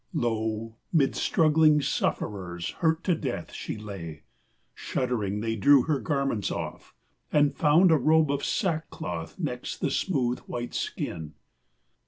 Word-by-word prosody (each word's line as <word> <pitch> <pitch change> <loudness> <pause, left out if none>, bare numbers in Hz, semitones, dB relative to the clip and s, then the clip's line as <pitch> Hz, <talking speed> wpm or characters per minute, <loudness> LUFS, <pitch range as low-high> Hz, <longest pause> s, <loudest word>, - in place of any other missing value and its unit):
Lo, 110 -4 -2
Mid 145 -6 +3
struggling 155 -1 +4
sufferers, 90 - -2
hurt 160 -1 +1
to 185 - +2
death, 135 - -4
she - - -5
lay! 95 -8 -8 0.5
Shuddering, 105 -5 -2
they 115 0 -1
drew 135 +5 +6
her 150 -4 0
garments 135 -9 -1
off - - -6 0.4
and 145 -1 +3
found 165 +4 +5
A 160 - +6
robe 155 +1 +4
of 140 0 -2
sackcloth 90 - -2
next - - -4
the - - -1
smooth, 125 -9 0
white 120 0 -5
skin. 75 -2 -4
125 Hz, 130 wpm, -27 LUFS, 105-155 Hz, 0.5 s, drew